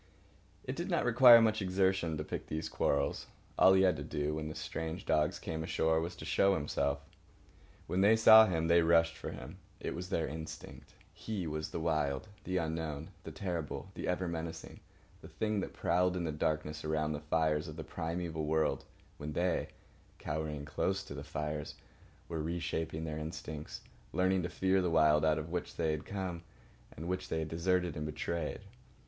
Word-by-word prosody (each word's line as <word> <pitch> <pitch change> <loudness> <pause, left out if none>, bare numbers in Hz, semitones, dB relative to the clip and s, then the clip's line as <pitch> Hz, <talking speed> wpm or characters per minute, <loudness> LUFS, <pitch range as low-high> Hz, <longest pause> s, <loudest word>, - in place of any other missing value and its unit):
It - - -4
did - - -4
not - - +1
require 120 0 +9
much 110 -1 +2
exertion 95 -3 +1
to 75 - -3
pick - - -5
these 80 +1 -3
quarrels. 70 0 0 0.3
All 95 - +8
he 95 0 +5
had 90 -4 +3
to 70 - -5
do, 75 +2 -2
when 75 0 -3
the 80 - -6
strange 80 +2 -5
dogs 75 0 +2
came 80 0 -4
ashore, 80 0 +1
was 85 +2 -4
to - - -9
show 100 0 +3
himself. 70 -2 -1 0.8
When 90 - 0
they 105 +3 +6
saw 110 0 +9
him 80 -2 0
they 85 0 +5
rushed 80 0 +4
for - - -6
him. - - -9 0.2
It - - -3
was 90 +2 -6
their 85 -5 0
instinct. 80 +3 -8 0.2
He 105 -5 -4
was 75 0 -3
the - - -4
Wild—the 80 +5 -2
unknown, 80 -3 -3
the - - -6
terrible, 90 -1 -4
the - - -5
ever 90 0 0
menacing, 80 -1 -5 0.4
the - - -10
thing 110 -1 -1
that - - -3
prowled 90 +1 +1
in 90 - -2
the 80 - -1
darkness 75 0 -2
around 75 0 0
the 75 - -3
fires 80 0 +1
of 75 - -7
the 80 - -6
primeval 80 -1 -3
world 80 0 +1 0.3
when 75 +1 -5
they, 90 +1 0 0.5
cowering 75 -1 -4
close 95 +6 -1
to 85 - -8
the 70 0 -6
fires, 75 0 -4 0.5
were 80 -2 -3
reshaping 80 -1 -3
their 80 -1 -4
instincts, 80 -1 -6 0.3
learning 95 +1 +2
to 90 - -3
fear 95 0 +2
the 90 - +1
Wild 75 -2 +4
out 80 -1 +3
of 80 +1 -5
which 90 0 -3
they 80 -2 +1
had 75 -1 -3
come, 95 -4 -4 0.5
and 80 - -7
which 95 +1 -3
they - - -1
had 80 0 -2
deserted 90 0 0
and 75 0 -3
betrayed. 80 +1 -3
80 Hz, 185 wpm, -33 LUFS, 75-90 Hz, 0.8 s, require